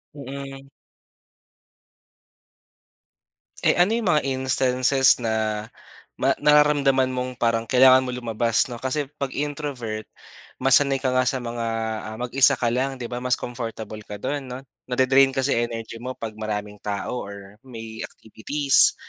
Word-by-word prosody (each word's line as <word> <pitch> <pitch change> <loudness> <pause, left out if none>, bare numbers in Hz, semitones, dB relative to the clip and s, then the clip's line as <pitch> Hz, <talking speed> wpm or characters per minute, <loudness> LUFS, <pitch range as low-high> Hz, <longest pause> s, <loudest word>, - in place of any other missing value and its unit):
Mm. 135 0 -8 2.9
Eh, - - +3
ano 180 +4 +3
'yong 230 -3 -1
mga 150 -4 +3
instances 130 0 +2
na 110 -2 -1 0.5
ma - - +1
nararamdaman 145 -3 +4
mong 125 0 -4
parang 115 -2 0
kailangan 130 0 +6
mong 125 - -4
lumabas 115 +2 +1
'no. 120 - -6
Kasi, 135 +2 -3
'pag 135 -2 -3
introvert 140 -7 -4 0.5
mas 135 -1 +6
sanay 140 -2 0
ka 130 - +1
nga 130 0 +2
sa 130 0 -1
mga, 115 -1 -4 0.5
ah, - - -9
mag-isa 125 +1 +4
ka 120 - 0
lang 135 +2 0
'di 120 -2 -7
ba 120 - -3
mas 125 0 0
comfortable 115 -3 -6
ka 105 - -6
do'n 145 -2 -3
'no, 125 +1 -7 0.3
na-de-drain 130 +1 +3
kasi 135 +1 0 0.2
energy 115 -1 -7
mo 130 +2 -5
'pag 110 -1 -6
maraming 105 -1 -4
tao 105 +4 -4
or 100 0 -10
may 115 -3 -9
activities. 140 - +2
125 Hz, 140 wpm, -23 LUFS, 115-135 Hz, 2.9 s, kailangan